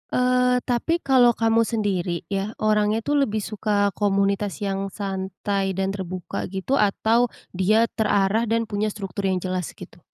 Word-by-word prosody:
eee, 250 0 +3
tapi 290 +8 0
kalau 250 -3 +5
kamu 225 0 +3
sendiri 190 -6 -1
ya, 195 +2 -1
orangnya 215 0 +2
itu 290 0 0
lebih 220 -6 +1
suka 205 -1 0
komunitas 200 0 +1
yang 195 0 -2
santai 195 0 -3
dan 195 0 -1
terbuka 185 -2 -5
gitu, 195 +8 -1
atau 225 +4 +3 0.3
dia 215 +5 +3
terarah 210 0 +1
dan 230 +1 +1
punya 210 0 -1
struktur 195 -1 -4
yang 185 -1 +1
jelas 185 -2 -3
gitu? - - -12
205 Hz, 150 wpm, -23 LUFS, 195-225 Hz, 0.3 s, kalau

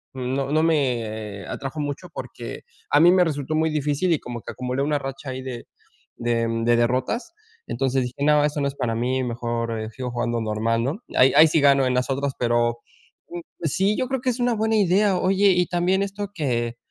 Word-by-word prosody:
no 130 +2 -2
no 155 +1 +3
me 115 -10 -1
atrajo 135 +3 -5
mucho 145 +4 -4
porque 120 -1 -7 0.3
a 145 - +5
mí 170 +3 +7
me 185 0 +5
resultó 155 -2 -2
muy 160 0 +1
difícil 150 +4 0
y 155 - 0
como 120 -1 -7
que - - -6
acumulé 125 +2 -2
una 145 0 0
racha 135 0 -6
ahí 130 0 -5
de 130 -2 -7 0.5
de 115 -1 0 0.2
de 120 +1 +4
derrotas, 130 - 0 0.3
entonces 130 +1 0
dije: 125 +3 -5
"No, 150 0 +4
eso 150 0 -1
no 140 - +1
es 140 - -5
para 125 -4 -1
mí, 125 +3 0
mejor, 115 -2 -3
sigo 125 +1 -5
jugando 120 -1 -1
normal", 115 +1 0
¿no?, 140 - -2 0.2
ahí 130 +1 +6
ahí 155 +2 +8
sí 160 +1 +2
gano 140 -2 +5
en 125 - 0
las 125 +2 0
otras, 140 +1 -1
pero, 120 0 +1 0.8
sí, 195 +6 +1
yo 255 - -1
creo 265 -2 -1
que 255 - 0
es 245 - -6
una 245 0 +2
buena 220 +1 +1
idea, 200 -1 +3
oye, 195 +2 +3
y 180 -1 +3
también 180 +2 +1
esto 200 +1 -4
que, 120 -8 -2
135 Hz, 200 wpm, -23 LUFS, 120-165 Hz, 0.8 s, ahí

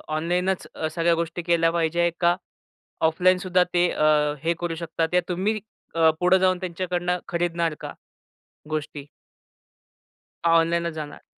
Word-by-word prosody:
ऑनलाईनच 180 +4 -1 0.2
सगळ्या 170 +1 +2
गोष्टी 170 +1 -3
केल्या 165 -1 +2
पाहिजे 170 +1 +1
का 175 0 +3 0.7
ऑफलाईनसुद्धा 180 +2 +3
ते 175 0 +4
अ, 150 -1 +2
हे 170 +1 +2
करू 175 -1 -2
शकतात 165 0 -3
या 180 - +5
तुम्ही 195 +5 -1 0.3
अ, 165 -1 +5
पुढं 180 +1 +5
जाऊन 185 -1 +2
त्यांच्याकडनं 180 0 -2
खरीदणार 170 -1 -1
का - - -6 0.8
गोष्टी? 150 -2 -4 1.5
ऑनलाइनच 170 0 +2
जाणार? 150 -2 -8
170 Hz, 120 wpm, -24 LUFS, 165-180 Hz, 1.5 s, या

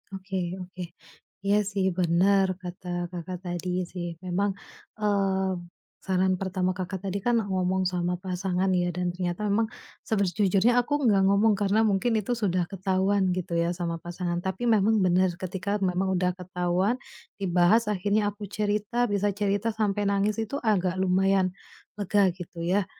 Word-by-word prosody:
Oke 190 -2 -3
oke. 180 0 -8 0.6
Iya 200 +1 +3
sih 195 -1 0
bener 185 +3 +3 0.2
kata 180 0 -8 0.2
Kakak 180 +1 -5
tadi 180 0 -2
sih, 175 -2 -4 0.2
memang, 195 +3 0 0.5
mmm, 190 -3 0 0.4
saran 190 0 +2
pertama 185 -1 0
Kakak 185 +1 -5
tadi 195 +1 -2
kan 240 +4 +1 0.2
ngomong 185 0 +1
sama 180 0 -1
pasangan 185 +1 -1
ya, 175 -1 +1
dan 180 -1 -1
ternyata 180 +2 -3
memang 220 +2 +2 0.4
sejujurnya 200 +2 +2
aku 265 +4 -4
nggak 200 -4 +4
ngomong 205 +2 +4
karena 205 +2 +3
mungkin 220 +3 +2
itu 210 +3 -4
sudah 185 -6 0
ketahuan 190 0 +1
gitu 180 -1 -4
ya 170 - +1
sama 170 -2 -3
pasangan. 175 0 -3
Tapi 190 +4 -3
memang 220 -1 +4
benar, 185 -1 +3
ketika 190 +2 -3
memang 190 +1 +1
udah 180 0 +2
ketahuan, 180 +4 0 0.4
dibahas, 185 +4 +3
akhirnya 205 +1 +1
aku 205 0 -8
cerita, 210 +3 0
bisa 205 0 +1
cerita 205 +2 0
sampai 205 -2 0
nangis 200 +2 +1
itu 220 +4 -4
agak 190 -5 +2
lumayan 190 0 +2 0.5
lega 200 -1 +3
gitu 175 -2 -9
ya. 185 +3 +1
190 Hz, 150 wpm, -27 LUFS, 180-205 Hz, 0.6 s, nggak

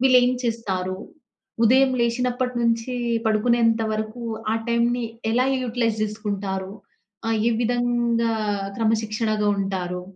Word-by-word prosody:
వీళ్ళేం 250 -1 +5
చేస్తారు, 190 -5 -2 0.7
ఉదయం 260 +3 +5
లేశినప్పట్నుంచి 240 0 0 0.3
పడుకునేంత 230 +1 +3
వరకు 215 +2 -4 0.3
ఆ - - +2
టైంని 235 +1 +1 0.3
ఎలా 250 +2 +3 0.2
యుటిలైజ్ 230 -2 -1
జేసుకుంటారు, 200 -3 -3 0.6
ఆ - - +1 0.2
ఏ - - +2
విధంగా 240 -1 +1 0.5
క్రమశిక్షణగా 220 -1 +1
ఉంటారు, 180 -2 -3
230 Hz, 95 wpm, -23 LUFS, 215-240 Hz, 0.7 s, వీళ్ళేం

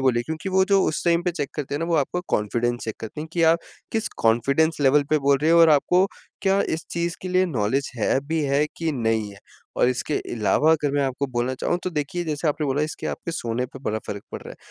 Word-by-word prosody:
बोलिए, 125 -3 +2
क्योंकि 160 +4 -4
वो 190 0 +3
जो 195 0 +3
उस 155 - -2
टाइम 170 0 +3
पे 180 - 0
चेक 150 -5 -4
करते 145 -1 -4
हैं - - -1
ना, 165 - -1
वो 170 - 0
आपका 180 - -4 0.2
कॉन्फिडेंस 120 +3 -1
चेक 110 - -4
करते 110 +7 -6
हैं, 160 - -6
कि 170 - +1
आप 165 +1 +5 0.3
किस 225 0 0
कॉन्फिडेंस 140 +8 +2
लेवल 145 +1 +5
पे 155 - +4
बोल 140 -1 +3
रहे 160 - +3
हो 170 0 +6
और 165 - +7
आपको 180 +6 +4 0.4
क्या 195 0 +3
इस 160 - -3
चीज़ 170 0 -2
के 185 - -4
लिए 185 +1 +3
नॉलेज 135 0 -1
है 110 - +2
भी 160 +1 0
है 140 +1 +2
कि 165 -1 -1
नहीं 110 -5 0
है? 100 - -13 0.4
और - - +4
इसके 125 +4 -1 0.2
अलावा 120 +7 +2
अगर 150 -2 +1
मैं 145 0 +2
आपको 135 +1 -2
बोलना 120 +2 0
चाहूँ, 175 - -1
तो 185 - -2
देखिए 160 +2 -2
जैसे 155 0 -1
आपने 150 0 -1
बोला 140 +2 0
इसके 155 - -4
आपके 170 - -4
सोने 125 -5 -2
पे 135 - -12
बड़ा 110 -2 -1
फ़र्क 100 - -5
पड़ - - -5
रहा - - -10
है। - - -10
145 Hz, 255 wpm, -24 LUFS, 125-165 Hz, 0.4 s, और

